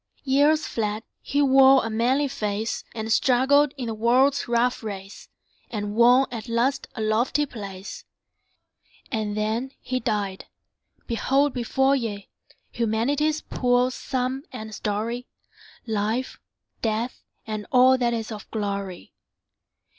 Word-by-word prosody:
Years 290 +3 +3
fled; 215 -1 -2 0.2
he 285 +1 +1
wore 270 -1 +6
a - - -2
manly 255 +6 +2
face, 215 -2 -3
And 220 0 -1
struggled 265 +4 +4
in 255 - -4
the 225 - -3
world's 250 +5 +2
rough 240 +2 +1
race, 200 -2 -8 0.4
And 205 -2 -4
won 245 +4 +6
at 235 0 -6
last 255 +4 0
a 225 - -4
lofty 235 +7 +1
place. 200 -6 -8 1.1
And 215 -3 -2
then 225 +5 -1
he 255 0 -2
died! 205 -5 -2 0.6
Behold 270 +4 +1
before 265 +3 +2
ye 210 -6 -4 0.4
Humanity's 275 +7 0
poor 250 0 +1
sum 260 0 -2
and 220 -4 -7
story; 220 +4 -3 0.6
Life, 220 +3 -2 0.4
Death, 225 +2 -2 0.2
and 215 -1 -5
all 255 +1 +6
that 240 -1 +2
is 225 0 -4
of 210 -2 -8
glory. 200 -4 -4
235 Hz, 125 wpm, -24 LUFS, 215-265 Hz, 1.1 s, wore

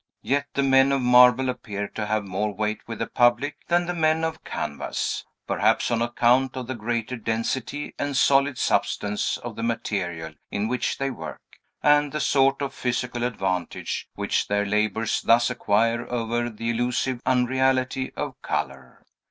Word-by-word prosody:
Yet 145 +1 0
the 140 - +2
men 135 0 +5
of 135 - +2
marble 125 +1 +6
appear 105 -5 -4
to 105 -1 -4
have 110 0 0
more 100 +3 -2
weight 105 +1 -2
with 115 - -5
the 115 - -1
public 120 +4 +2
than 175 0 +2
the 175 - -2
men 160 -1 +2
of 160 0 -3
canvas; 70 - -3 0.2
perhaps 110 +3 +1
on 115 -1 +1
account 120 +2 +2
of 130 - -4
the 130 - -4
greater 120 +1 -3
density 115 +5 -3
and 145 -1 -1
solid 135 0 +3
substance 105 0 0
of 120 -2 -8
the - - -6
material 95 -8 -2 0.2
in 100 +2 -1
which 125 +2 -1
they 135 0 -1
work, 80 - -7 0.4
and 145 -1 +4
the 150 - -1
sort 135 -1 +2
of 135 -1 -3
physical 125 -1 -2
advantage 95 -7 -2
which - - -1
their 100 0 +1
labors 105 +2 0
thus 120 +2 +4
acquire 115 +1 +1
over 120 0 -1
the 115 +1 -3
illusive 120 +1 -1
unreality 130 +1 +1
of - - -5
color. 65 -2 -4
120 Hz, 160 wpm, -25 LUFS, 110-130 Hz, 0.4 s, marble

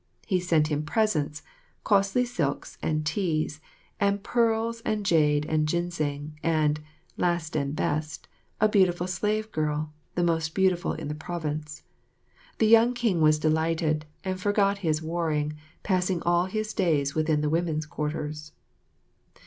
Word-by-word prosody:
He 185 -3 +1
sent 165 -4 +2
him 150 0 0
presents, 155 -4 0 0.4
costly 200 +4 +3
silks 160 - -2
and 155 -1 -1
teas, 155 -2 -1 0.4
and 200 0 +1
pearls 230 -1 +1
and 215 -3 -2
jade 150 -4 +3
and 155 0 +1
ginseng, 150 -3 -2
and, 155 -2 +2 0.4
last 170 -3 0
and 140 -1 -1
best, 150 0 -2 0.3
a 215 - +5
beautiful 185 -4 +3
slave 210 +4 -1
girl, 150 0 -2 0.2
the 175 - +1
most 160 -2 0
beautiful 190 -2 +2
in - - -6
the 150 - -3
province. 155 -2 -5 0.7
The 220 - +3
young 230 +3 +6
King 225 -9 +1
was 155 0 +5
delighted, 155 0 0 0.2
and 185 -1 -3
forgot 200 -1 +2
his 160 -4 0
warring, 160 -2 -1 0.3
passing 185 -2 0
all 175 +1 +3
his 215 +2 -3
days 150 -8 +1
within 155 -1 +1
the 150 - 0
women's 160 -2 0
quarters. 150 -1 -4
165 Hz, 140 wpm, -27 LUFS, 150-195 Hz, 0.7 s, young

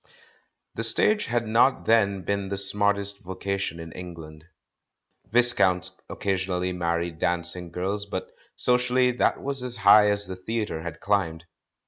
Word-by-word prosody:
The - - -3
stage 210 0 +2
had 120 0 -1
not 115 +5 +3
then 100 -4 +2
become 100 0 -2
the 100 - -3
smartest 100 0 +1
vocation 95 -1 -4
in 80 0 -8
England. 80 -3 -10 0.9
Viscounts 120 -6 +2
occasionally 90 -2 -2
married 85 -1 -2
dancing 85 0 0
girls, 100 +4 -3
but 95 -2 -5 0.2
socially 125 0 +2
that 125 - 0
was 135 -1 -3
as 125 -1 -3
high 105 0 +6
as 105 0 -1
the 95 - -6
theatre 105 -3 -3
had 85 0 -7
climbed. 85 -5 0
100 Hz, 135 wpm, -25 LUFS, 90-110 Hz, 0.9 s, high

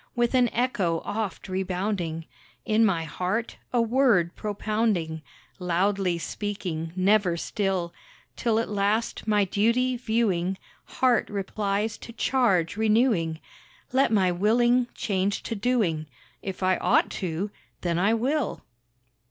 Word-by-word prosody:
With 240 0 +1
an 250 -2 +4
echo 195 -9 0
oft 215 -2 -3
rebounding, 185 -3 -2 0.4
In 220 0 +3
my 185 -7 +2
heart 185 +8 -3
a 245 - +2
word 230 -8 +3
propounding, 210 -6 -1 0.4
Loudly 180 0 +1
speaking, 170 -4 -4
never 190 -2 +3
still; 185 -2 -2 0.4
Till 230 -3 +1
at 230 - 0
last, 210 +3 -1
my 210 -2 +3
duty 235 +6 +1
viewing, 205 -6 0 0.3
Heart 250 -3 +1
replies 205 +1 -2
to - - -9
charge 205 -10 +1
renewing, 215 -8 +2 0.5
Let 265 -2 +3
my 190 -4 +3
willing 240 +6 +3
change 200 -1 -1
to - - -3
doing, 200 -9 0 0.3
If 190 -1 -5
I 185 0 +3
ought - - +2
to, 185 +3 -2 0.3
then 170 -1 0
I 205 +5 +3
will. 265 +2 -1
205 Hz, 120 wpm, -26 LUFS, 180-230 Hz, 0.5 s, an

